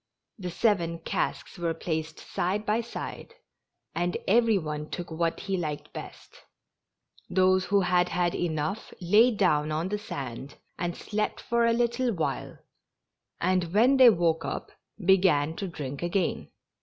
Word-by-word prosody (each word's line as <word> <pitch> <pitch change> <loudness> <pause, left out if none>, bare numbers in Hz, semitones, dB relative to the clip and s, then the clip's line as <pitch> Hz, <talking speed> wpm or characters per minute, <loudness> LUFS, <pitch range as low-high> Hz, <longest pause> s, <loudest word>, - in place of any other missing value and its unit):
The 180 -2 -4
seven 170 -4 +1
casks 165 +2 -3
were 165 -1 -1
placed 160 -1 -3
side 200 +4 -2
by 215 +2 +1
side, 235 - -7 0.6
and 175 +1 -1
every 225 +1 +4
one 150 -3 -4
took 175 -1 -6
what 165 +1 -1
he 195 -1 -2
liked 150 -4 -4
best; - - -10 0.9
those 185 0 +3
who 200 +2 +3
had 180 -1 +2
had 175 0 +1
enough 160 +4 -2
lay 210 +7 +5
down 165 -9 +2
on 160 +4 -1
the 210 +1 -2
sand 140 - -6 0.2
and 175 0 -2
slept 210 0 -2
for 235 0 +1
a 230 - +3
little 240 +1 +1
while, 165 -4 -3 0.8
and 180 0 0
when 250 +6 +5
they 255 -2 +9
woke 170 -5 +2
up - - -4 0.3
began 170 -5 +4
to 195 - -3
drink 140 -5 -6
again. 175 +1 -1
180 Hz, 145 wpm, -28 LUFS, 165-210 Hz, 0.9 s, they